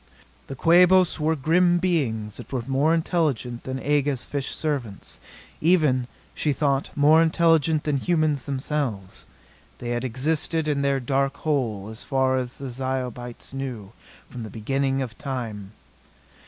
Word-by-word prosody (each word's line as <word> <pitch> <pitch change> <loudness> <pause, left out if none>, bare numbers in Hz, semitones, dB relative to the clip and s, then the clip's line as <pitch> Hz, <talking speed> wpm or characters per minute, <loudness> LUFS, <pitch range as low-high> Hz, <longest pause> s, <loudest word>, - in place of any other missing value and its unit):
The 135 - -6
Quabos 180 +5 +5
were 155 +1 +1
grim 175 +5 +3
beings 120 - -1
that - - -10
were 130 -3 -2
more 135 +5 +2
intelligent 155 -8 0
than 130 0 -3
Aga's 145 -2 0
fish 140 -2 -3
servants 135 -10 -4 0.4
even, 150 -7 +3 0.3
she 150 - 0
thought, 140 0 0
more 150 +3 +6
intelligent 165 -2 +3
than 150 -2 0
humans 155 -3 +1
themselves. 135 -8 -3 0.5
They 120 - -6
had 120 0 -1
existed 155 +5 -1
in 145 -2 +1
their 140 -1 +1
dark 135 +2 0
hole, 115 -10 -1
as 110 - -9
far 130 -1 +1
as 125 -1 -5
the 135 -2 -6
Zyobites 125 -1 -4
knew, 125 -7 -5 0.4
from 125 - -8
the 110 - -6
beginning 135 +5 -1
of 115 -4 -7
time. 115 -7 -5
135 Hz, 140 wpm, -24 LUFS, 125-155 Hz, 0.5 s, more